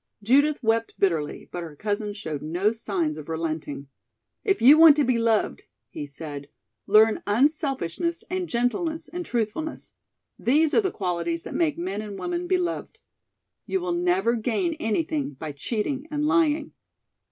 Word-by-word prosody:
Judith 285 +6 +3
wept 225 0 +1
bitterly, 160 -6 0
but 175 - -4
her 160 -3 -8
cousin 210 +4 -2
showed 160 -9 -5
no 175 +7 +1
signs 190 -9 -2
of 155 0 -9
relenting. 155 -4 -4 0.6
"If 390 -2 +1
you 285 +6 +8
want 325 -3 +9
to 295 - +3
be 245 -2 +2
loved," 230 -2 +1 0.3
he 145 - -6
said, 145 -1 -8 0.4
"learn 215 +2 +5
unselfishness 285 - 0
and 365 -1 -3
gentleness 310 +8 -1
and 355 +1 -5
truthfulness. 245 +5 -3 0.5
These 300 +5 +3
are - - +5
the 385 - 0
qualities 170 - -2
that - - -7
make 320 -4 +1
men 190 +4 -3
and 205 -2 -7
women 350 - -3
beloved. 360 -2 -1 0.7
You 380 - 0
will 355 -1 -2
never 355 -6 +2
gain 245 - 0
anything 295 - -1
by 150 +3 -6
cheating 240 - -3
and 295 0 -1
lying." 310 0 +2
230 Hz, 150 wpm, -25 LUFS, -, 0.7 s, want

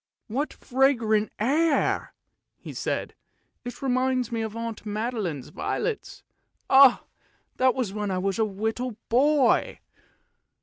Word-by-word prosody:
"What 270 +7 -2
fragrant 235 -5 +1
air!" 295 +7 +1 0.4
he - - -10
said; - - -3 0.5
"it 245 +2 -8
reminds 255 -1 0
me 230 -1 -2
of 220 -1 -4
Aunt 230 -1 -5
Magdalene's 210 - -3
violets; 435 - -4 0.5
ah! 270 -2 +7 0.5
that 255 -1 +3
was 240 -7 -2
when 210 -1 -3
I 185 - -1
was 195 +3 -1
a - - +4
little 220 +3 -3
boy! 275 +2 +3
235 Hz, 120 wpm, -26 LUFS, 215-260 Hz, 0.5 s, ah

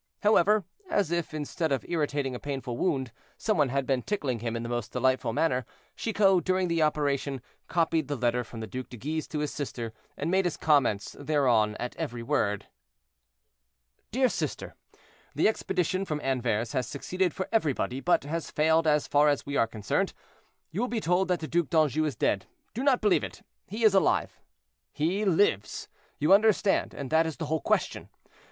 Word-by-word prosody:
However, 210 -1 +4 0.2
as 200 - +1
if, 170 -1 -1
instead 155 +1 -2
of 135 - 0
irritating 145 -5 -1
a 125 - -5
painful 135 -4 -4
wound, 130 -4 0 0.3
some 215 - 0
one 145 -4 +3
had 135 +1 0
been 130 -2 +1
tickling 140 - -2
him 115 0 -3
in 115 - -3
the - - -4
most 120 -2 -3
delightful 130 -1 +1
manner, 130 0 +1 0.3
Chicot, 195 -5 +2
during 185 -1 +1
the 165 -1 +1
operation, 145 -3 0 0.3
copied 165 -3 +1
the 145 - -2
letter 125 -1 0
from 115 0 -9
the - - -3
Duc 125 +5 -6
de 120 - -9
Guise 155 +7 -3
to 155 - -5
his 150 0 -2
sister, 120 -5 -5 0.2
and 155 +4 -2
made 190 0 +3
his 175 - -1
comments 130 -10 +2
thereon 130 -8 +2
at 125 - -5
every 120 -8 -4
word. 105 -3 0 1.4
"DEAR 255 +3 +3
SISTER—The - - -4
expedition 185 -3 0
from 155 -6 -3
Anvers 120 -4 0
has 130 -4 -1
succeeded 180 +8 -1
for 190 - -4
everybody, 145 - 0
but 175 -1 +2
has 160 +3 -4
failed 160 +1 +2
as 150 -1 +3
far 145 +1 +4
as 145 - 0
we 140 - -4
are 115 - +3
concerned. 110 -2 -1 0.6
You 185 +7 -2
will 245 - +1
be 235 -2 -2
told 180 0 +1
that 180 -2 0
the 155 - -4
Duc 170 -1 0
d'Anjou 155 -2 +2
is 150 - -2
dead; 95 -3 0 0.3
do 235 - -3
not 270 -2 +3
believe 210 -3 +3
it—he 215 +4 -8
is 215 -3 +6
alive. 195 - +2 0.5
"He 180 +8 0
lives, 165 - +1 0.3
you 150 +6 +4
understand, 210 -1 +3
and 140 -1 -6
that 160 +1 +4
is 160 - -5
the 165 - -3
whole 155 +1 -1
question. - - -1
150 Hz, 185 wpm, -28 LUFS, 130-180 Hz, 1.4 s, is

